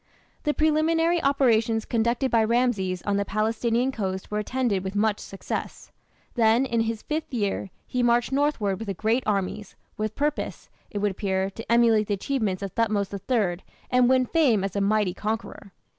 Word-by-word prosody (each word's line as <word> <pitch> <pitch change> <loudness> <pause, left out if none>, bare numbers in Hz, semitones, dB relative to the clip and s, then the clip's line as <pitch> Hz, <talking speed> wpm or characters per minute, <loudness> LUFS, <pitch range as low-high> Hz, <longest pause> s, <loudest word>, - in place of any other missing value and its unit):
The 295 - +1
preliminary 325 +2 +2
operations 230 -5 +2
conducted 235 +3 0
by 230 -1 +4
Rameses 220 -6 0
on 205 -1 0
the 200 - +1
Palestinian 225 +5 0
coast 190 -6 -4
were 210 - 0
attended 220 -4 -1
with 190 +1 -5
much 210 0 +1
success. 195 - -6 0.4
Then, 230 +2 +3
in 235 -3 0
his 225 -1 -2
fifth 310 0 -3
year, 205 -5 -2 0.2
he 250 - -2
marched 240 +1 +2
northward 265 -9 0
with 225 -2 -6
a 195 - -2
great 225 +6 +1
army, 200 0 -1 0.3
with 215 0 -3
purpose, 295 +1 -3 0.2
it 210 - -6
would 205 0 +1
appear, 190 0 -1
to 225 +3 -7
emulate 230 -3 +4
the 205 - 0
achievements 200 -4 -2
of 195 - -4
Thothmes 210 -3 0
III 200 -3 0 0.3
and 250 -1 +4
win 260 -1 +4
fame 250 - +2
as 195 0 -3
a 200 - +1
mighty 205 -2 +2
conqueror. 215 -1 -5
220 Hz, 175 wpm, -25 LUFS, 200-250 Hz, 0.4 s, by